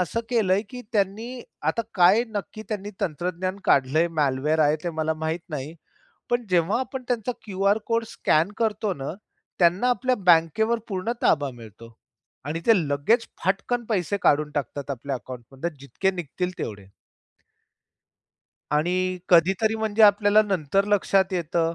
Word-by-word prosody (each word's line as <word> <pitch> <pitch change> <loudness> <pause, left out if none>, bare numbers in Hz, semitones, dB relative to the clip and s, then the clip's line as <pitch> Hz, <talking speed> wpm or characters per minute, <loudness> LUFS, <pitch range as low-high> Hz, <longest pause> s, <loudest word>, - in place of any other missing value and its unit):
असं 180 +6 -1
केलंय, 205 -4 +2
की 250 -1 -7
त्यांनी 205 +3 0 0.4
आता 230 - -2
काय 185 +5 +5
नक्की 215 +2 -5
त्यांनी 205 -1 -4
तंत्रज्ञान 180 +4 -2
काढल 135 +2 +3
आहे. 170 +2 +4
म्यालवेअर 150 0 0
आहे 150 - +2
ते 175 - -1
मला 155 0 0
माहित 160 +2 -1
नाही. 150 +1 -5 0.6
पण 240 -1 0
जेव्हा 180 +5 +2
आपण 260 0 -5
त्यांचा 245 -1 -1
क्यूआर 200 0 +1
कोड 230 0 +1
स्कॅन 165 +6 +1
करतो 215 -3 0
ना, 140 - -3 0.5
त्यांना 180 +8 +3
आपल्या 255 +1 +1
बँकेवर 175 +8 +4
पूर्ण 195 +3 -2
ताबा 145 -3 +2
मिळतो 115 0 -13 0.5
आणि 155 +3 -3
ते 230 - +6 0.2
लगेच 215 - +1 0.2
फटकन 200 +6 0
पैसे 200 -1 0
काढून 150 +1 +3
टाकतात 140 +1 -4
आपल्या 135 +1 -4
अकाउंटमधुन. 130 +5 -6
जितके 190 +8 -1
निघतील 180 +1 -4
तेवढे. 100 -3 -5 1.9
आणि 155 +4 +1 0.3
कधीतरी 190 +6 +4
म्हणजे 220 0 +1
आपल्याला 205 +1 +6
नंतर 195 -1 0
लक्षात 195 -2 +2
येतं. 170 -1 0
185 Hz, 140 wpm, -24 LUFS, 155-215 Hz, 1.9 s, ते